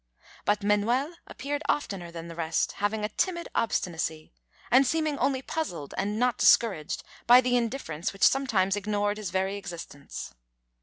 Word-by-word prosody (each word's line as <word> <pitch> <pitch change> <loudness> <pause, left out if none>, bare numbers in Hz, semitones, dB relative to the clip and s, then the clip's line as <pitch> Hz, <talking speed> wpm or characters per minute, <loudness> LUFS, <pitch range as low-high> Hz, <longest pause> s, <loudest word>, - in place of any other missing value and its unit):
But 205 0 +1
Manuel 235 +9 +2
appeared 290 +2 -4
oftener 195 -11 -1
than 170 0 -8
the 170 - -8
rest, 165 -1 0
having 210 +1 -1
a - - -3
timid 340 - -1
obstinacy, 160 - -2 0.4
and 260 +2 +6
seeming 310 -1 0
only 265 -1 +1
puzzled 175 - -4
and 205 +2 -1
not 245 +1 +1
discouraged 195 -10 +3 0.2
by 245 +1 +9
the 250 -1 +1
indifference 230 - -2
which 195 - -5
sometimes 210 -8 +2
ignored 205 0 -1
his 210 -4 -4
very 190 +2 -1
existence. 170 -7 -8
210 Hz, 150 wpm, -28 LUFS, 185-255 Hz, 0.4 s, by